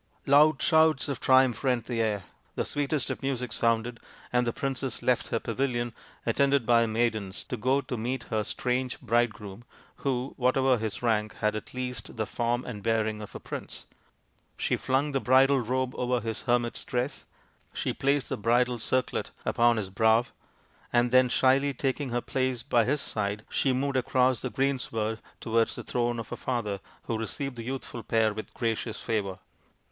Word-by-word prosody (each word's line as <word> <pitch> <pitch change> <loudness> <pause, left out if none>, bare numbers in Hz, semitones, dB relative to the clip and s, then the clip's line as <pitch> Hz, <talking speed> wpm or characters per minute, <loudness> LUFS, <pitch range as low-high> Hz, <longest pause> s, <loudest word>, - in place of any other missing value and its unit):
Loud 145 +1 +5
shouts 160 -3 +4
of 140 - -2
triumph 130 -3 +4
rent 125 -4 +1
the 120 -2 -1
air, 105 -3 0 0.3
the - - -1
sweetest 145 -1 -1
of - - -5
music 125 -4 -2
sounded, 115 0 +1 0.3
and 125 0 +2
the - - +2
princess 135 -1 -3
left 125 -1 +2
her 115 - -1
pavilion, 120 0 -1 0.3
attended 140 +2 +2
by 115 0 +5
her 115 - +2
maidens, 110 -4 -1
to - - -4
go 130 +4 +1
to 130 - -5
meet 120 +2 -2
her 110 -1 +1
strange 125 +3 -2
bridegroom, 110 -3 -1 0.3
who, 130 -1 -2
whatever 130 0 +3
his 110 +1 -4
rank, 110 -2 +1
had 105 0 0
at 110 - -7
least 125 -3 -5
the 110 - 0
form 120 +3 -1
and 105 -5 -6
bearing 110 -1 0
of 105 - -9
a - - -5
prince. - - -7 0.7
She - - +1
flung 135 +3 0
the 135 - +1
bridal 135 +2 +5
robe 130 +2 -1
over 125 0 0
his 115 -1 -4
hermit's 120 -1 +1
dress; 125 +2 -3 0.5
she - - -2
placed 140 0 +1
the - - -2
bridal 120 +3 +2
circlet 130 +3 -1 0.2
upon 120 0 +3
his 100 -3 -3
brow; 110 +4 +4 0.7
and 120 0 +3
then 130 0 +5
shyly 135 +3 +3
taking 135 +1 -1
her 120 0 -1
place 130 -2 -1
by 115 -2 +3
his 140 +3 0
side 105 -2 -2
she 135 - +2
moved 135 +1 0
across 130 -1 +2
the 130 - -2
greensward 115 -5 -1 0.2
towards 115 0 +1
the - - -6
throne 120 -1 -1
of 115 -2 -6
her - - -4
father, 105 -6 -2 0.2
who 115 -1 -2
received 135 +4 -3
the 115 - -6
youthful 130 -1 -5
pair 110 0 +2
with 110 +1 -7
gracious 115 -1 -2
favour. 100 -4 -2
120 Hz, 175 wpm, -28 LUFS, 115-130 Hz, 0.7 s, Loud